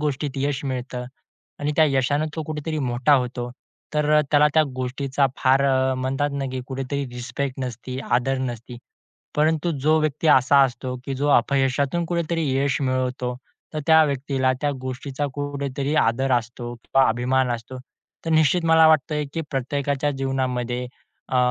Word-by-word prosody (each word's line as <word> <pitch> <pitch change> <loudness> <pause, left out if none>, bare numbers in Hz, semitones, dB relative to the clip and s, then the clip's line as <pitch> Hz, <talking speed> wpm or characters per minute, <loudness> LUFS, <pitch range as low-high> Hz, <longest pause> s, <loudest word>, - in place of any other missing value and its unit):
गोष्टीत 145 -1 -1
यश 140 0 -1
मिळतं 125 -1 -4 0.5
आणि 145 +1 -1
त्या 160 - +6
यशाने 145 +1 +1
तो 160 - -2
कुठेतरी 155 +1 -4
मोठा 125 0 +1
होतो, 125 -1 -1 0.4
तर 150 0 +1
अ, - - +6
त्याला 150 0 +5
त्या 160 - +6
गोष्टीचा 135 +2 0
फार 135 +1 +3
अ, 130 -1 +2
म्हणतात 135 +3 -1
ना, 140 -1 -2
की 130 - -3
कुठेतरी 135 +2 -3
रिस्पेक्ट 130 +2 -4
नसती, 125 +1 -6
आदर 130 +2 +1
नसती. 120 +1 -9 0.6
परंतु 155 +2 +2
जो 155 +3 +3
व्यक्ती 155 +1 -1
असा 140 0 +5
असतो, 125 0 -4
की 140 - -3
जो 140 +2 -1
अपयशातून 140 +4 +2
कुठेतरी 165 -2 -1
यश 140 +1 +1
मिळवतो, 130 -1 -1 0.4
तर - - -1
त्या 160 -1 +7
व्यक्तीला 135 -2 0
त्या 145 - +1
गोष्टीचा 130 +2 -4
कुठेतरी 140 0 -3
आदर 130 +4 +1
असतो 120 0 -2
किंवा 135 +3 +2
अभिमान 125 +2 +1
असतो. 120 +2 -5 0.5
तर 165 - -2
निश्चित 160 +2 +3
मला 160 0 +6
वाटतंय, 150 -1 +2
की 165 - -1
प्रत्येकाच्या 140 +1 -1
जीवनामध्ये 130 -2 -2 0.5
अ, - - +2
135 Hz, 155 wpm, -23 LUFS, 130-145 Hz, 0.6 s, त्या